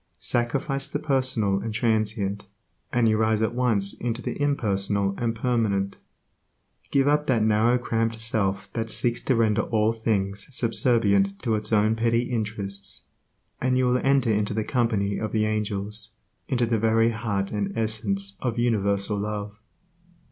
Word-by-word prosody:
Sacrifice 130 - -1
the - - -3
personal 130 -9 +1
and 110 +2 -4
transient, 110 -3 0 0.4
and 120 -2 +3
you 110 -1 +3
rise 110 0 +2
at 110 - 0
once 115 -6 +1
into 115 0 -3
the 135 - -5
impersonal 100 -7 +1
and 115 -1 -1
permanent. 110 -5 0 0.9
Give 140 0 +2
up 150 +1 +2
that 115 -5 +2
narrow 110 +3 +3
cramped 115 -2 -1
self 100 -4 -1
that 115 -1 -3
seeks 120 0 0
to 130 - +1
render 110 -2 +2
all 110 -1 +1
things 100 -3 -1
subservient 110 -5 +2
to 115 -3 +1
its 105 +1 -2
own 110 +1 +3
petty 115 +1 +1
interests, 100 -4 -3 0.6
and 125 0 +2
you 130 - +2
will 125 0 +2
enter 135 -4 +3
into 105 0 0
the 110 - 0
company 105 -5 0
of 110 - -4
the 110 -1 +2
angels, 105 0 -2 0.4
into 125 -4 +1
the 115 -1 0
very 115 +1 +3
heart 105 -4 -2
and 100 -2 -2
essence 100 -3 -2
of 120 -2 -2
universal 100 -3 +1
Love. 105 0 -4
110 Hz, 155 wpm, -25 LUFS, 100-120 Hz, 0.9 s, and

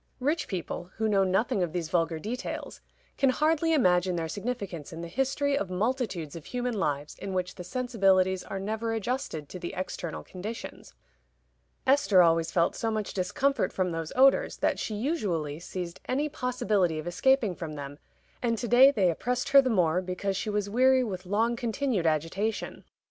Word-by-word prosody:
Rich 295 +6 0
people, 175 -1 -5
who 220 - 0
know 200 -2 +3
nothing 195 +4 +1
of 175 -3 -1
these 170 -3 -2
vulgar 165 -2 +1
details, 230 +10 -5 0.4
can 275 - +4
hardly 315 +4 +2
imagine 180 - +3
their 165 -1 -2
significance 200 - -5
in 165 0 -7
the 170 - -5
history 270 +7 0
of 200 -9 -2
multitudes 190 - -2
of 165 - -9
human 245 0 -2
lives 150 -8 -2
in 195 - -5
which 185 0 -1
the 180 - -8
sensibilities 190 -4 +2
are 195 - -5
never 220 +3 -2
adjusted 225 - -3
to 185 - -7
the 175 - -5
external 180 -2 -4
conditions. 210 +5 -8 0.9
Esther 260 -9 +5
always 165 -1 +3
felt 170 -1 +1
so 225 - -1
much 215 -2 -2
discomfort 265 +10 0
from 185 -2 -1
those 165 -1 -4
odors 270 +1 +4
that - - 0
she 215 - -3
usually 195 - -2
seized 180 0 -6
any 280 +4 +1
possibility 240 - 0
of 155 - -5
escaping 220 +4 +2
from 165 -3 -6
them, 145 0 -7 0.4
and 230 -2 0
to 240 - -3
day 250 +4 +8
they 195 -10 +2
oppressed 250 - -2
her 275 0 +8
the 260 - -1
more 180 -5 +2
because 185 +2 -3
she 215 - -2
was 210 -1 -1
weary 255 +4 +4
with 185 -5 -5
long 225 +5 +1
continued 235 - -1
agitation. 165 +8 -1
200 Hz, 175 wpm, -28 LUFS, 175-250 Hz, 0.9 s, day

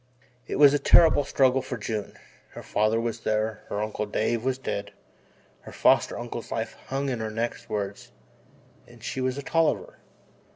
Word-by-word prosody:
It - - -3
was 145 0 +7
a 145 - +2
terrible 160 -2 +6
struggle 135 -1 +2
for 130 -2 -5
June. 105 -1 -4 0.4
Her - - -9
father 110 +2 +1
was 115 -1 -2
there, 110 0 -1
her 105 +1 -2
uncle 105 0 -3
Dave 110 +2 -1
was 130 0 0
dead, 100 -6 -4 0.7
her - - -12
foster - - +3
uncle's - - -6
life - - -3
hung 135 0 -2
on 120 - -3
her 110 0 -3
next 115 +2 -4
words 100 -1 -4 0.8
and - - -17
she 130 - -3
was 130 +1 -1
a 140 - -5
Tolliver. 165 +2 0
115 Hz, 170 wpm, -26 LUFS, 110-135 Hz, 0.8 s, was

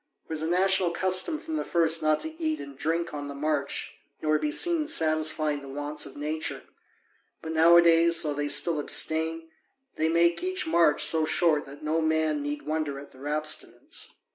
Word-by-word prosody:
It - - -15
was 155 -1 -3
a 160 - -2
national 185 +1 +2
custom 185 - +1
from 320 0 -5
the - - -2
first 165 -1 +1
not 155 0 +2
to 320 +1 -6
eat 315 -1 -1
and 140 -1 -9
drink 165 +4 -2
on 145 -1 -5
the 140 - -7
march 145 -1 -3 0.2
nor 155 0 +1
be 300 - -2
seen 330 -1 +1
satisfying 155 - +1
the 140 - -11
wants 145 +2 -3
of - - -12
nature, 155 +2 -3 0.8
but 160 - -5
nowadays, 170 0 +5
though 150 -2 -1
they 145 0 -3
still 155 +2 +3
abstain, 160 +2 0 0.5
they 160 +1 +1
make 170 +1 +2
each 370 -1 -2
march 165 - +3
so 160 +1 +1
short 155 -2 +1
that 140 +2 -12
no 155 +2 0
man 160 -1 0
need 145 +1 -4
wonder 155 -2 -3
at 140 +1 -11
their 135 +2 -10
abstinence. 155 +1 -3
160 Hz, 185 wpm, -26 LUFS, 150-170 Hz, 0.8 s, nowadays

